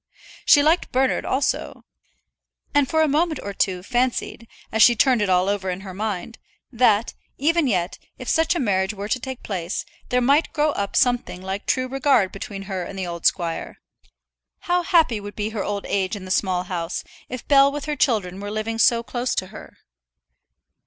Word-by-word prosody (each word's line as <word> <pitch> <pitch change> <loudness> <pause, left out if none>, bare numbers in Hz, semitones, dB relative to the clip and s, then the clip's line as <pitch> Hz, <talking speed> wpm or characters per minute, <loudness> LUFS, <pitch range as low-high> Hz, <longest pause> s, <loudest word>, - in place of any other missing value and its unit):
She 290 - +6
liked 320 +4 +2
Bernard 260 +1 +1
also; 270 +1 -1 0.9
and 285 -3 +3
for 315 0 +3
a - - +3
moment 310 +1 +1
or 200 - -5
two 185 -2 -1
fancied, 245 0 -1 0.2
as 220 - +1
she 240 - +7
turned 245 0 +3
it 205 - 0
all 180 0 +3
over 200 -2 -1
in 180 +1 -4
her 190 -1 -8
mind, 210 +2 -4 0.3
that, 230 -3 +2 0.2
even 320 +2 +2
yet, 180 -5 -1 0.2
if - - -9
such 325 +2 +2
a - - 0
marriage 195 -3 0
were 200 +1 -5
to 255 - 0
take 260 0 -7
place, 180 -3 -3 0.2
there 250 - +2
might 280 +6 +2
grow 305 -1 +2
up 200 -7 -3
something 245 -7 +1
like 190 +2 -5
true 255 0 +1
regard 265 -6 +2
between 195 0 -7
her 190 -2 -4
and 195 +3 -8
the 190 - -2
old 170 -1 0
squire. 170 -3 -2 0.8
How 355 -1 +1
happy 330 - +3
would 205 0 -9
be 210 0 -2
her 215 -3 -3
old 205 -1 -3
age 190 +1 -1
in 195 -2 -8
that 185 - -6
Small 185 -1 +1
House, 175 -2 -4 0.3
if 255 -2 -7
Bell 275 -1 +6
with 290 0 -5
her 300 -1 -2
children 205 -9 0
were 205 0 -5
living 215 +2 -3
so 235 -1 +4
close 245 +1 -2
to 185 - -1
her! - - -12
220 Hz, 195 wpm, -23 LUFS, 190-270 Hz, 0.9 s, she